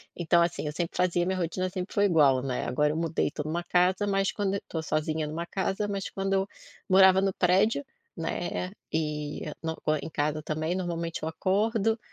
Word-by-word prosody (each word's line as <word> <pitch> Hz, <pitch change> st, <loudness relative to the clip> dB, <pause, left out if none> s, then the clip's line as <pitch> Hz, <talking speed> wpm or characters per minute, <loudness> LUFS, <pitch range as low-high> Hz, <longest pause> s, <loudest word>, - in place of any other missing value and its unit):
então, 170 Hz, 0 st, +3 dB
assim, 170 Hz, -2 st, 0 dB
eu 150 Hz, -, -2 dB
sempre 170 Hz, 0 st, -3 dB
fazia 175 Hz, -1 st, +2 dB
minha 185 Hz, +1 st, -1 dB
rotina 185 Hz, +2 st, -1 dB
sempre 180 Hz, +1 st, -5 dB
foi 205 Hz, -, +4 dB
igual, 145 Hz, -8 st, +4 dB
né. 130 Hz, -2 st, -2 dB
Agora 150 Hz, +4 st, +1 dB
eu -, -, -3 dB
mudei, 165 Hz, -1 st, 0 dB
tô 150 Hz, -, -4 dB
numa 160 Hz, +3 st, -2 dB
casa, 180 Hz, +3 st, +2 dB
mas 195 Hz, -1 st, +1 dB
quando 200 Hz, -1 st, -1 dB
tô 160 Hz, -, -2 dB
sozinha 155 Hz, 0 st, -1 dB
numa 165 Hz, +3 st, -4 dB
casa 195 Hz, +3 st, -1 dB
mas 200 Hz, -1 st, -3 dB
quando 195 Hz, 0 st, -2 dB
eu 195 Hz, 0 st, +1 dB, 0.4 s
morava 190 Hz, 0 st, +7 dB
no 195 Hz, -1 st, +1 dB
prédio, 195 Hz, +11 st, +2 dB, 0.3 s
né, 175 Hz, +2 st, -3 dB, 0.2 s
e 150 Hz, -2 st, -2 dB, 0.2 s
na 160 Hz, 0 st, -2 dB
co 155 Hz, -, 0 dB
em 150 Hz, -, -6 dB
casa 150 Hz, +1 st, -1 dB
também 155 Hz, +3 st, -2 dB
normalmente 170 Hz, -3 st, -3 dB
eu 160 Hz, -, -1 dB
acordo, 215 Hz, +6 st, +1 dB
175 Hz, 195 wpm, -28 LUFS, 155-190 Hz, 0.4 s, morava